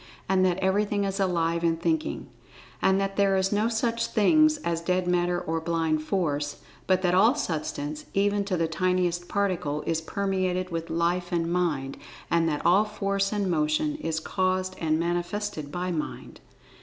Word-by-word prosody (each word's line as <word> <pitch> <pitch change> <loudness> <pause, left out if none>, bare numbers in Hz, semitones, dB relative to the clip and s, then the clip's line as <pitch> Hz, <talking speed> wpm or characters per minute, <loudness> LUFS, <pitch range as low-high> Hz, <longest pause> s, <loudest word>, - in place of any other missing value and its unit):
And 190 0 +3
that 180 -1 +2
"Everything 200 +2 +1
is 195 0 -2
Alive 170 -3 +1
and 165 -1 +1
Thinking." 320 - -1 0.5
And 190 0 +3
that 195 0 -2
there 195 -1 +3
is 190 0 +1
no 210 +2 +2
such 230 0 0
things 310 +8 +4
as 165 -1 -1
"Dead 180 +1 0
Matter," 175 0 +1
or 165 -2 -2
"Blind 160 -2 0
Force," 150 -4 -2 0.3
but 185 0 +2
that 180 -1 +2
all 220 +8 +5
Substance, 155 - -3
even 205 +1 +2
to 190 -2 -1
the 165 -1 +1
tiniest 175 +1 0
Particle, 180 -8 -1
is 165 -1 0
permeated 185 0 -1
with 165 0 -4
Life 175 +2 0
and 170 -1 0
Mind, 150 -7 -1 0.3
and 165 -1 +3
that 150 -1 -3
all 185 +5 +5
Force 195 -2 -1
and 205 -2 -1
Motion 165 - +1
is 160 - -2
caused 185 +2 -1
and 155 -1 +1
manifested 175 -2 -2
by 180 +2 -2
Mind. 155 -3 -5
180 Hz, 170 wpm, -26 LUFS, 165-195 Hz, 0.5 s, all